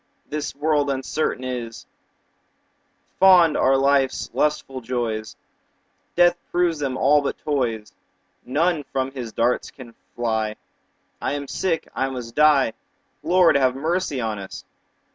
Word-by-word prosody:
This 150 -2 -4
world 145 0 +1
uncertain 135 0 -2
is: 120 -3 -5 1.3
Fond 180 -4 +6
are 135 +1 +3
life's 135 -1 +1
lustful 140 -3 -1
joys, 115 -3 -3 0.8
Death 175 0 +4
proves 175 -3 +1
them 135 -3 -2
all 145 +3 +4
but 140 - -3
toys. 120 -7 -2 0.5
None 155 +4 0
from 130 0 -1
his 125 -4 -6
darts 120 +3 0
can 120 -4 -13 0.2
fly; 110 -2 -1 0.6
5 - - -2
I - - -2
am 145 -1 -4
sick, 165 0 -2
I 135 0 -1
must 125 -3 -7
die— 150 -6 +4 0.5
Lord, 175 +2 +4
have 130 -2 +3
mercy 160 0 -1
on 110 -3 -2
us! 95 - -9
135 Hz, 130 wpm, -22 LUFS, 120-150 Hz, 1.3 s, Fond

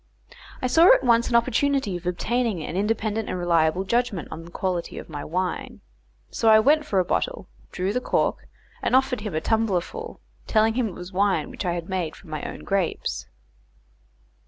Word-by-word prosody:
I - - +2
saw 325 +8 +6
at - - -2
once 235 -1 +3
an 240 - 0
opportunity 255 -2 +2
of 175 0 -6
obtaining 220 0 -1
an 160 - -5
independent 215 +1 -1
and - - -2
reliable 170 0 +2
judgment 235 -4 -1
on 160 +1 -7
the - - -11
quality 180 -1 -3
of - - -8
my 145 -2 -6
wine; 180 +3 -3 0.5
so 225 - +2
I 220 - +8
went 300 +6 +3
for 200 - 0
a 185 - +3
bottle, - - -2 0.2
drew 190 +2 -2
the 250 - 0
cork, - - 0 0.3
and - - +1
offered 260 -3 +2
him 205 -6 -5
a 155 - 0
tumblerful, 225 - -1 0.3
telling 220 0 +3
him 245 -1 0
it 190 - -7
was 180 +1 -9
wine 200 +1 +1
which - - -6
I 175 - +1
had 170 -1 -4
made 180 -4 -2
from 165 - -15
my 155 - -3
own - - -7
grapes. 195 -3 -2
205 Hz, 190 wpm, -24 LUFS, 180-235 Hz, 0.5 s, I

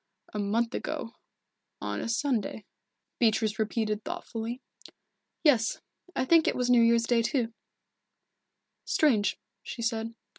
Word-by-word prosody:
"A 210 - -3
month 225 +4 0
ago 230 - -4 0.7
on - - -3
a - - -3
Sunday," 230 -3 -1 0.5
Beatrice 220 -2 +2
repeated 215 -1 -1
thoughtfully. 240 -9 -5 0.8
"Yes 250 -8 +3 0.4
I 260 - +1
think 330 +3 +5
it - - +2
was 250 0 +1
New 240 -1 +6
Year's 230 0 +5
Day, 235 -1 +3
too." 230 -1 0 1.3
"Strange," 235 -10 +2 0.2
she 235 - -6
said. 230 0 -2
230 Hz, 120 wpm, -29 LUFS, 220-250 Hz, 1.3 s, New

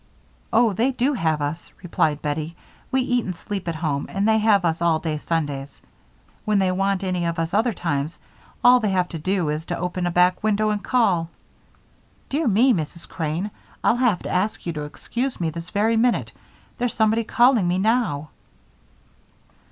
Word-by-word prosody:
"Oh, 230 -2 +4
they 230 +7 +1
do 265 +2 0
have 160 - 0
us," 150 +4 -4
replied 155 -4 0
Bettie. 155 +2 -3 0.4
"We 265 0 +2
eat 245 -2 +1
and 185 - -4
sleep 190 +2 -6
at 165 - -2
home 155 -3 -2
and 195 +2 0
they 220 0 +4
have 210 -4 +3
us 165 0 0
all 170 -2 +3
day 155 -2 -3
Sundays. 145 -4 -3 0.6
When 215 -1 +1
they 190 -1 +2
want 195 +1 0
any 180 -2 -1
of 170 0 -2
us 165 +2 -2
other 225 +4 +2
times, 160 -5 -2 0.5
all 250 0 +7
they 215 -3 0
have 185 -2 +1
to 165 - -6
do 180 0 0
is 150 +1 -2
to - - -3
open 180 0 -2
a - - -1
back 180 +1 +3
window 215 0 +2
and 205 -1 -2
call 190 -10 +2 1.0
Dear 295 +1 0
me, 235 +5 +4
Mrs. 170 -2 -4
Crane, 165 +5 -3 0.3
I'll 240 - +3
have 240 -8 +1
to - - -5
ask 205 +4 -1
you 170 - -2
to 150 -1 -4
excuse 245 - -4
me 165 -2 -1
this 170 +2 -7
very 220 +2 +1
minute 240 +1 +1 0.5
There's 245 -1 -1
somebody 220 +1 +2
calling 240 -3 +3
me 175 +1 +1
now." 190 - 0
185 Hz, 185 wpm, -23 LUFS, 165-220 Hz, 1.0 s, all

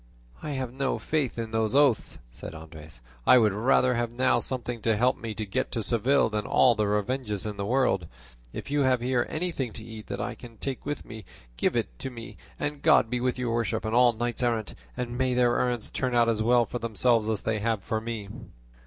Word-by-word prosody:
"I 150 -1 -4
have 130 -3 -3
no 135 0 -1
faith 150 -7 -1
in 115 -1 -4
those 110 +1 0
oaths," 140 -6 +3
said 80 - -9
Andres; 80 -4 -11 0.3
"I 125 - +8
would 110 -4 +4
rather 125 +4 +3
have 120 -1 -1
now 125 +2 +2
something 120 -3 -2
to 110 -1 +1
help 125 +4 +3
me 110 -2 -6
to 110 - -3
get 95 - -2
to 115 - -1
Seville 125 +6 +2
than 105 0 -2
all 125 - +5
the 105 -2 0
revenges 105 0 -1
in 105 -1 -4
the 100 -1 -3
world; 120 -9 +1 0.4
if - - -7
you 145 0 +2
have 130 -2 +3
here 125 0 +1
anything 155 -7 -2
to 110 - -8
eat 110 -1 -9
that - - -4
I - - -2
can 115 -2 -13
take 135 +2 -4
with 145 - -4
me, 110 -2 -9 0.3
give - - 0
it - - -3
me, 120 -2 -7 0.2
and 145 -1 -3
God 110 - +4
be 125 -1 -1
with 125 0 0
your 120 -2 -1
worship 115 -1 -1
and 110 - -2
all 120 0 +6
knights 120 +2 -3
errant; 115 -3 0 0.2
and 125 0 -4
may 130 -1 +1
their 120 -1 +3
errands 125 -3 -1
turn 130 -2 -1
out 120 -1 +4
as 110 -2 0
well 120 +1 +4
for 120 - -5
themselves 115 0 +1
as 110 -3 -1
they 110 -1 0
have 110 -2 -1
for 110 -1 -2
me." 110 -3 -5
120 Hz, 225 wpm, -27 LUFS, 110-125 Hz, 0.4 s, I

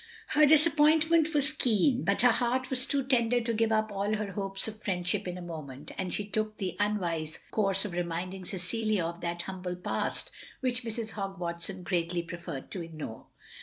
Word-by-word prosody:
Her 300 0 +6
disappointment 315 +1 +5
was 290 +1 +3
keen, 250 -1 +3
but 200 +3 +2
her 245 - +8
heart 250 +3 0
was 260 0 +2
too 280 -1 +1
tender 245 -2 +3
to 230 0 -1
give 225 0 +2
up 215 0 +2
all 200 +2 0
her 210 -1 -3
hopes 195 +1 -1
of 215 0 -7
friend 180 -4 -2
ship 195 +1 0
in 180 0 -3
a 180 - -7
moment, 150 -4 -7
and 185 -2 -3
she 205 - -2
took 215 +1 -1
the 185 -4 -3
tmwise 170 -7 0
course 195 -2 +2
of 205 - -3
reminding 175 +2 -3
Cecilia 195 +1 -1
of 170 +1 -5
that 170 0 -2
humble 185 -1 -4
past, 180 - -2 0.3
which 255 -2 0
Mrs. 225 -1 -4
Hogg 195 -2 -4
Watson 175 +2 -4
greatly 170 -1 0
preferred 170 -4 -7
to 185 - -3
ignore. 155 -9 -7
200 Hz, 190 wpm, -30 LUFS, 175-235 Hz, 0.3 s, her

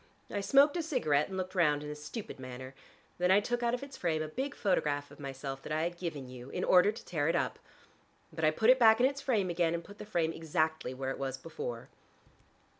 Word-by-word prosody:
I 205 - -1
smoked 280 - +5
a - - +1
cigarette 195 - +1
and 190 - -6
looked 185 0 -3
round 150 -5 +2
in 150 - -5
a - - -5
stupid 150 - -7
manner. 130 +1 -8 0.5
Then 180 0 +2
I 190 +2 +7
took 240 +3 -2
out 240 0 +2
of 250 - -7
its 280 -1 -9
frame 160 -3 0
a - - -4
big 265 - -4
photograph 145 -8 0
of 145 - -14
myself 135 -1 -6
that - - -8
I 155 +1 +1
had 175 +1 -2
given 150 -7 -4
you, 125 0 -10
in 180 - -3
order 185 +3 +5
to 215 - -11
tear 155 -4 -1
it 165 - +2
up. - - -1 0.7
But 160 0 -5
I 155 - +6
put 220 +10 +4
it 260 - +4
back 220 -1 +7
in 250 - +5
its 275 +1 0
frame 210 -10 +1
again, 170 -1 +1
and 170 - -4
put 205 +2 -14
the - - -7
frame 165 -5 0
exactly 160 -4 -1
where 135 0 -3
it - - -6
was 135 -1 -3
before." 125 -5 -6
165 Hz, 245 wpm, -32 LUFS, 145-210 Hz, 0.7 s, I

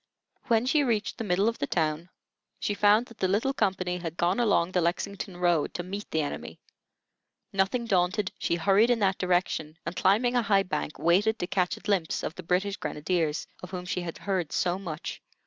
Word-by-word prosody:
When 230 -1 +3
she 290 +3 +3
reached 225 -5 -1
the - - -2
middle 195 +1 +2
of 230 - -1
the 140 - -1
town 160 +1 -1 0.5
she 205 - -1
found 210 +3 +4
that 230 -2 -16
the 190 - +2
little 215 +8 +1
company 185 -6 0
had 170 -1 -6
gone 180 +5 +1
along 200 -7 +2
the 180 - +2
Lexington 185 +2 -2
road 175 -4 +1
to 175 - -3
meet 200 +3 -6
the 160 -1 0
enemy. 145 - -6 0.9
Nothing 195 +5 +1
daunted, 185 -1 +1
she - - 0
hurried 200 +6 +4
in 245 - +4
that 190 -1 +2
direction 175 -4 0
and, 170 - -4
climbing 225 +8 +3
a 245 - +4
high 200 -3 +3
bank, 180 -4 -3
waited 200 +7 +3
to - - -2
catch 180 0 0
a - - -13
glimpse 195 -6 0
of - - -3
the 185 - -8
British 185 +4 0
grenadiers, 155 -3 -1 0.2
of 180 - -8
whom 180 -1 -5
she 180 - -2
had 170 -2 -5
heard 185 -6 -2
so 180 +1 0
much. 165 -5 -6
185 Hz, 200 wpm, -28 LUFS, 175-205 Hz, 0.9 s, found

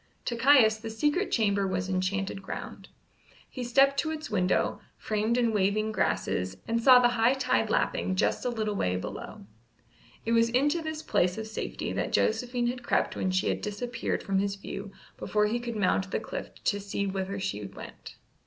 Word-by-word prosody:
To 240 - -1
Caius 235 -3 +5
the 225 +1 -7
secret 295 - 0
chamber 200 -3 +2
was 185 -1 -2
enchanted 190 +1 -1
ground. 190 - -7 0.6
He 255 - -6
stepped 275 +3 +4
to 315 - 0
its 310 -4 -5
window, 185 -3 +1 0.2
framed 215 +2 0
in 235 -2 +2
waving 210 +2 +1
grasses, 95 - -1
and 230 0 0
saw 255 +1 +8
the 245 -1 +5
high 240 +2 +3
tide 265 - +1
lapping 185 - 0
just - - +1
a 250 - 0
little 215 -3 -2
way 90 - 0
below. 95 +1 -6 0.8
It 230 - -1
was 230 0 +4
into 290 +7 +2
this 315 -1 -5
place 180 +2 +1
of 220 - -4
safety 220 - -4
that - - -2
Josephine 240 +2 +1
had 245 +1 -2
crept - - 0
when 185 - -1
she 185 0 +1
had - - -1
disappeared 225 +4 -3
from 195 -1 0
his 200 0 -1
view 200 0 -7 0.3
before 210 0 +1
he 225 +3 0
could 235 -1 -5
mount 190 -1 +1
the - - -1
cliff - - -6
to 205 - +1
see 200 0 -3
whither 195 0 -3
she 105 - -3
went. 95 - -10
220 Hz, 185 wpm, -28 LUFS, 195-245 Hz, 0.8 s, saw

